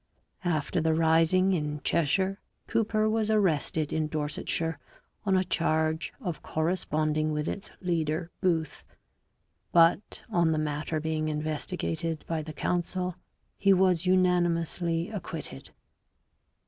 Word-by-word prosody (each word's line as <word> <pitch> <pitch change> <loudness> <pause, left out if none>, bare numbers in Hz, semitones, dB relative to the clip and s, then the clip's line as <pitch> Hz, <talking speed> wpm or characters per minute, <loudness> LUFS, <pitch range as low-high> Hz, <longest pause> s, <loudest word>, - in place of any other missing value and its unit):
After 165 0 0
the 160 0 +2
rising 165 +4 +4
in 150 -3 -2
Cheshire 190 +5 +1 0.3
Cooper 215 -1 +1
was 215 0 +1
arrested 160 -7 +1
in 155 -1 0
Dorsetshire 155 +2 -2 0.5
on 190 -1 +4
a 185 - +3
charge 160 -2 0
of 180 - -4
corresponding 155 -2 0
with 150 0 -2
its 200 - -4
leader 165 -1 -1
Booth, 165 -5 0 0.9
but 170 +4 +3
on 170 -6 +2
the - - 0
matter 155 +1 -2
being 155 0 -1
investigated 155 +1 -3
by 165 -1 -1
the 155 +1 -7
council 180 +3 -1 0.5
he 200 -1 +5
was 185 -2 +3
unanimously 175 -1 +1
acquitted. 165 - -6
165 Hz, 115 wpm, -28 LUFS, 155-185 Hz, 0.9 s, he